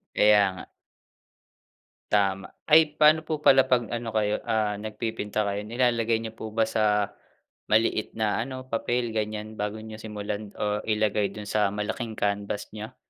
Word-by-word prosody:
Kaya 105 -1 +6
nga. 95 - -9 1.5
Tama. 95 -2 +1 0.2
Ay 155 -1 +5
paano 155 +1 +6
po 155 0 -3
pala 135 -2 +6
pag 120 -3 +2
ano 120 0 -3
kayo, 105 -1 0
ah, 110 -2 +1
nagpipinta 110 -1 -3
kayo? 100 0 -2
Nilalagay 115 0 +1
niyo 110 -1 -6
po 110 0 -7
ba 110 +1 +2
sa 105 -2 +1 0.5
maliit 110 0 +1
na 110 +1 0
ano, 130 0 -8
papel 120 +1 -1
ganyan 110 0 -4
bago 105 +1 -3
niyo 110 0 -9
simulan 105 -1 -6
o 105 0 -1
ilagay 105 -2 +1
dun 105 -1 -8
sa 105 -2 +1
malaking 110 +2 -3
canvas 100 -1 -2
niyo? 110 +4 -8
110 Hz, 150 wpm, -26 LUFS, 105-115 Hz, 1.5 s, Kaya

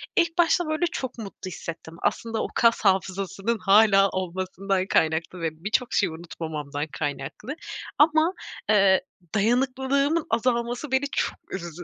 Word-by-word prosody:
ilk 340 -1 +2
başta, 345 0 +3
böyle, 310 +3 0
çok 260 -2 -4
mutlu 200 -4 -8
hissettim. 165 -1 -8
Aslında 225 -1 -1
o - - -2
kas 230 -1 +4
hafızasının 195 +3 +1
hâlâ 195 0 +5
olmasından 185 +1 -2
kaynaklı 160 +2 +1
ve 165 - +1
birçok 235 +4 0
şeyi 185 -4 +2
unutmamamdan 155 -3 -5
kaynaklı 145 - -5 0.4
ama, 315 +3 +4 0.4
eee, 195 -3 +5 0.3
dayanıklığımın 265 +7 +1
azalması 240 +3 0
beni 265 +1 +2
çok - - -1 0.2
üzdü. 175 -2 -6
200 Hz, 125 wpm, -25 LUFS, 180-255 Hz, 0.4 s, hâlâ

